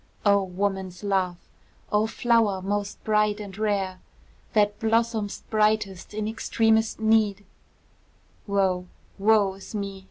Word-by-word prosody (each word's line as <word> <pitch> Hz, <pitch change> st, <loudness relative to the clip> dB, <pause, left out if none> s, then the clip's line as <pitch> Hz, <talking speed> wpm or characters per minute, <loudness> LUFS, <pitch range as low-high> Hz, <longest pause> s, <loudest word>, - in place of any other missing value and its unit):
O 200 Hz, -1 st, +5 dB
woman's 190 Hz, 0 st, -3 dB
love! 190 Hz, -3 st, 0 dB, 0.5 s
O 210 Hz, +1 st, +2 dB
flower 225 Hz, -4 st, +2 dB
most 205 Hz, +1 st, -3 dB
bright 210 Hz, -1 st, +2 dB
and 200 Hz, -3 st, -8 dB
rare! 200 Hz, -3 st, -1 dB, 0.5 s
That 205 Hz, -1 st, +2 dB
blossom'st 225 Hz, -2 st, 0 dB
brightest 210 Hz, -3 st, 0 dB
in 215 Hz, 0 st, -2 dB
extremest 220 Hz, 0 st, +1 dB
need, 220 Hz, -2 st, +2 dB, 1.0 s
Woe, 190 Hz, -2 st, +1 dB, 0.3 s
woe 205 Hz, -1 st, +4 dB
is 195 Hz, +3 st, -10 dB
me! 200 Hz, -1 st, -4 dB
205 Hz, 115 wpm, -25 LUFS, 195-220 Hz, 1.0 s, O